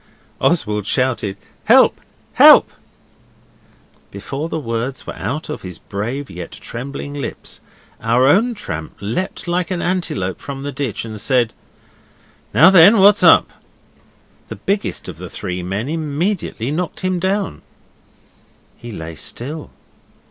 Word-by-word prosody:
Oswald 105 - 0
shouted 120 -7 -1 0.3
'Help, - - +5 0.3
help!' - - +8 1.4
Before 135 +10 -5
the 160 - -3
words 125 -1 -4
were - - -6
out 130 +11 -4
of 150 - -6
his 90 -2 -8
brave 120 +8 -5
yet 90 -1 -8
trembling 140 +4 -7
lips 145 -1 -7 0.4
our 115 +3 +3
own 220 - +3
tramp 80 - -6
leapt 115 - -4
like 175 0 -1
an 185 -2 -2
antelope 170 - -2
from 135 -1 -7
the 145 - -4
ditch 135 -5 -3
and 110 -2 -6
said 120 -2 +2 1.0
'Now 165 +5 +7
then, 195 +4 +8
what's 205 +2 +6
up?' - - +6 1.0
The - - -7
biggest 200 +1 -2
of 85 -3 -8
the 90 -1 -7
three 90 +2 -5
men 95 +7 -3
immediately 155 - -2
knocked 175 +3 -3
him 185 -1 -1
down. 190 - -1 1.2
He 120 - -9
lay 80 -5 -7
still. 140 - -5
135 Hz, 130 wpm, -19 LUFS, 105-170 Hz, 1.4 s, help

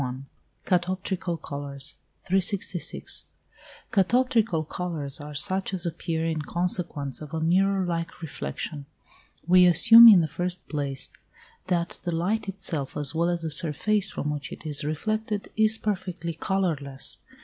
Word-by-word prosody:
XXXI. 130 0 -5 0.4
CATOPTRICAL 185 -1 -1
COLOURS. 140 -1 -5 0.3
366. 190 -1 -3 0.7
Catoptrical 225 -4 +2
colours 155 -6 -5
are 150 0 -9
such 190 +6 -1
as 180 -1 -1
appear 165 -1 -3
in 160 -1 -2
consequence 170 -5 -2
of 155 +1 -7
a - - -2
mirror 190 +4 +2
like 165 -1 -4
reflection. 145 -1 -6 0.6
We 180 +1 +6
assume, 225 +7 +9
in 200 -6 +8
the 160 - -1
first 180 +3 -3
place, 140 -3 -3 0.6
that 175 -1 -2
the 175 - -2
light 200 +5 -1
itself 160 -7 -3
as 145 0 +2
well 170 +2 +1
as 175 -1 -2
the 160 - -3
surface 185 +7 +4
from 150 -7 -4
which 145 -2 -6
it - - -10
is 150 -2 -1
reflected, 210 +7 -3
is 220 0 +2
perfectly 180 -5 -4
colourless. 160 -7 -2
170 Hz, 140 wpm, -25 LUFS, 150-190 Hz, 0.7 s, assume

